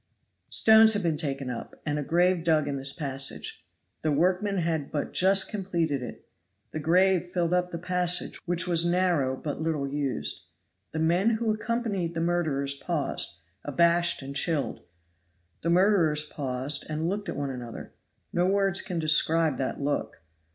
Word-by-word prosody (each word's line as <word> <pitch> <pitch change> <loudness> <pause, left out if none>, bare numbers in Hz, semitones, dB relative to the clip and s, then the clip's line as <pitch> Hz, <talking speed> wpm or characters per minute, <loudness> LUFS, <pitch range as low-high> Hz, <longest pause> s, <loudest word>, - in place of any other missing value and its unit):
Stones 220 0 +7
had 205 -2 0
been 165 -2 +1
taken 135 -4 -3
up, 120 - -8
and 150 -1 -1
a - - -2
grave 175 +3 +2
dug 155 -3 +2
in 140 - -2
this 135 0 +1
passage. 140 - -4 0.4
The 155 - 0
workmen 185 +6 +1
had 165 -4 -1
but 145 - -3
just 190 +1 +4
completed 170 -8 -1
it. 125 - -9 0.4
The 155 - -4
grave 180 +3 +3
filled 175 -1 -1
up 180 0 +1
the 170 - -5
passage, 180 0 -1
which 175 +1 0
was 170 -2 +2
narrow 170 -7 +1
and - - -15
but 150 0 -4
little 155 -3 -1
used. 135 - -3 0.5
The - - -5
men 170 +7 +2
who 220 -1 0
accompanied 215 -6 -2
the - - -1
murderers 160 -5 0
paused, 140 - -2 0.2
abashed 170 +2 +2
and 140 +1 -7
chilled. 160 -1 -1 0.8
The 170 - -1
murderers 170 -4 +3
paused 140 -1 -2
and 155 +1 -2
looked 200 +3 -3
at - - -4
one 140 -1 -2
another; 120 -3 -8 0.4
no 175 +1 +2
words 195 -1 +2
can 180 -4 -4
describe 160 -1 +2
that 130 - -2
look! 140 - -3
165 Hz, 165 wpm, -27 LUFS, 145-180 Hz, 0.8 s, Stones